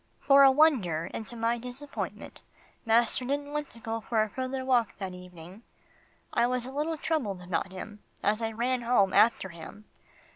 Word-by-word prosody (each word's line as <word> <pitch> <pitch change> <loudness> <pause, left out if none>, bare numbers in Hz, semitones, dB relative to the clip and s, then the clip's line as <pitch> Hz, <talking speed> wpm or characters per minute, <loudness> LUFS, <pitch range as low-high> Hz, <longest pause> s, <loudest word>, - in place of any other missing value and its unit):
For 275 0 +6
a 270 - +9
wonder, 250 - +2
and 220 - -5
to 240 - -7
my 230 +1 0
disappointment, 250 +4 -7 0.5
master 235 +2 +3
didn't 285 +3 -3
want 300 -1 -3
to 230 - -15
go 225 0 -3
for 220 -1 +1
a 215 - -4
further 260 +3 -4
walk 245 -4 +1
that 190 -2 -5
evening. 180 +2 -12 0.7
I 235 - +3
was 250 -1 -1
a 260 - -7
little 305 +3 -2
troubled 270 - -2
about 180 +1 -2
him, 205 +3 -8 0.2
as 215 +2 +1
I 225 0 -1
ran 245 +3 -1
home 230 -5 +2
after 220 -4 +4
him. 180 +5 -11
235 Hz, 180 wpm, -28 LUFS, 205-260 Hz, 0.7 s, a